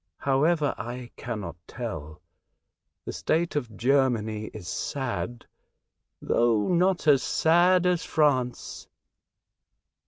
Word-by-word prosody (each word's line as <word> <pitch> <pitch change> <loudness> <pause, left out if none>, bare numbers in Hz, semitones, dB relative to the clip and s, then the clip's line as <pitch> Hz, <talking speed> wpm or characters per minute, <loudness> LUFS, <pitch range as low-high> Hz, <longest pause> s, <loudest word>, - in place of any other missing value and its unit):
However, 145 +2 +2
I 120 +2 -6
cannot 105 -8 -6
tell. 80 +4 -7 0.8
The - - -5
state 170 +1 0
of 120 -8 -3
Germany 120 -5 +1
is 105 -5 -9
sad, 120 -2 -4 0.7
though 115 -3 +2
not 180 0 +2
as 140 -3 +6
sad 175 +3 +3
as 180 -2 +2
France." 130 -6 0
130 Hz, 95 wpm, -26 LUFS, 115-160 Hz, 0.8 s, as